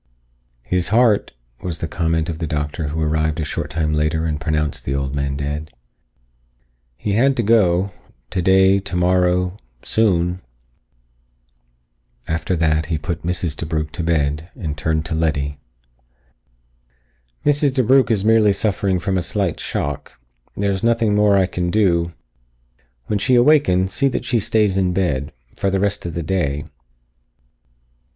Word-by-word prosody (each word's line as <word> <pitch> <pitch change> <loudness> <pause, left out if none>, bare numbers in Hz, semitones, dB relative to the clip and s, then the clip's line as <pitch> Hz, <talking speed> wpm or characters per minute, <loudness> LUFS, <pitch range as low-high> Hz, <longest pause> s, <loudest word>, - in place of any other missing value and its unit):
"His 90 -1 0
heart," 110 -1 +3 0.3
was 85 -3 -3
the 80 - -3
comment 80 0 -1
of 80 -2 -4
the 80 - -2
doctor 75 +1 -3
who 75 +3 -3
arrived 80 +1 0
a 80 - -1
short - - -4
time 75 0 -1
later 75 +1 0
and 75 -2 -2
pronounced 75 -1 -1
the 70 - -2
old 70 -1 -2
man 70 -1 -2
dead. 75 +2 -4 1.3
"He 100 - -2
had 130 +5 +3
to 120 - +1
go. 100 -4 +3 0.4
Today, 95 +1 +4
tomorrow. 90 0 +1 0.2
Soon." 90 -5 +1 1.9
After 85 +3 -1
that, 80 -2 +1
he 80 -1 -1
put 80 +2 -4
Mrs. 85 -2 -2
DeBrugh 80 -1 -3
to - - -5
bed 80 -1 0
and 75 -4 -4
turned 80 +2 -1
to 80 - -4
Letty. 75 -3 -1 1.9
"Mrs. 145 -1 +3
DeBrugh 130 0 +4
is 105 -3 +1
merely 110 -2 +5
suffering 100 -2 0
from 95 +2 -1
a - - -1
slight 95 -2 -1
shock. 70 -3 -4 0.4
There 100 0 +1
is 95 - -2
nothing 115 -2 +2
more 105 0 +4
that 95 - +4
I - - +3
can 90 -1 -2
do. 85 -4 +2 0.9
When 105 - -1
she 130 +4 +3
awakens, 120 -9 +4
see 140 - +2
that 125 -2 -2
she 120 -1 +1
stays 105 -2 +2
in 90 -1 +1
bed. 75 -7 -1 0.2
For 100 - 0
the 95 0 0
rest 100 -2 -1
of 85 - -6
the 85 - -2
day." 75 -4 -1
90 Hz, 150 wpm, -20 LUFS, 80-100 Hz, 1.9 s, merely